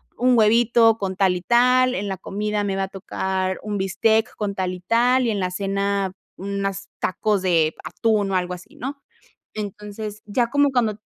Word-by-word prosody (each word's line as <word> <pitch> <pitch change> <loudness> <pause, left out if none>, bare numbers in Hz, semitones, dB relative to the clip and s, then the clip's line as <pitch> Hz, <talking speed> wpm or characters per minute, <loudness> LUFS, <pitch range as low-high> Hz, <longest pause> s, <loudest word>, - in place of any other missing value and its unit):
un 250 0 +3
huevito 225 +1 +4
con 190 -1 -3
tal 190 -1 +2
y 180 - -4
tal, 250 +3 +4
en 205 - -3
la 190 -1 -3
comida 210 +2 -2
me 195 -1 -1
va 195 - -1
a 190 - -2
tocar 190 0 -3
un 205 -2 -3
bistec 220 +4 +2
con 205 -2 -2
tal 185 -1 -2
y 180 - -8
tal, 245 +6 +3
y 230 - +1
en 205 - -2
la 185 -1 0
cena 195 0 -1 0.3
unas 195 0 -3
tacos 200 +1 0
de 165 -4 +2
atún 215 -3 0
o 190 - -1
algo 180 0 -1
así, 180 0 -12
¿no?". 275 +4 -6 0.5
Entonces, 210 0 -6
ya 235 +3 0
como 285 0 +3
cuando 220 -4 +1
205 Hz, 190 wpm, -22 LUFS, 190-225 Hz, 0.5 s, huevito